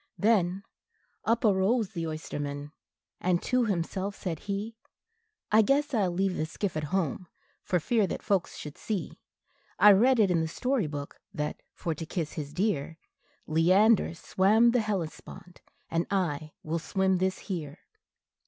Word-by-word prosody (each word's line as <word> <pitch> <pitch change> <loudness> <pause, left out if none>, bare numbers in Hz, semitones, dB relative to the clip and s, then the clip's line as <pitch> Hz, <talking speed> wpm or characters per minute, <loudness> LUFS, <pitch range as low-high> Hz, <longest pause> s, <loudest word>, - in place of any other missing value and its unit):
Then 195 -3 +2 0.6
up 230 +1 +2
arose 205 +2 +3
the 165 -5 -3
oysterman, 145 -2 -5 0.5
and 180 -1 +1
to 250 -1 +2
himself 195 +1 -2
said 165 -5 -4
he, 205 +3 -4 0.8
"I 215 +1 +7
guess 280 +5 +1
I 210 -5 +2
'll - - -2
leave 190 +1 0
the 155 - -2
skiff 190 +2 -3
at 155 -1 -2
home, 180 +1 -1 0.3
for 180 -3 0
fear 220 +3 +1
that - - -5
folks 195 -4 0
should 150 -1 -8
see 210 -5 -4 0.6
I 210 - +8
read 240 +6 +5
it 200 -4 +4
in 170 -2 +2
the 160 - -1
story 250 - -1
book, 145 -1 -7
that, 150 0 -3
for 165 - -2
to 160 +2 -6
kiss 160 -2 -3
his 145 -3 -5
dear, 165 -4 -1 0.5
Leander 185 +5 +4
swam 215 +7 +3
the 245 -1 +2
Hellespont, 180 -2 -5 0.3
and 165 +1 0
I 155 -6 -1
will 165 +2 -2
swim 190 +2 +1
this 185 0 0
here." 165 -6 -5
185 Hz, 155 wpm, -28 LUFS, 160-210 Hz, 0.8 s, I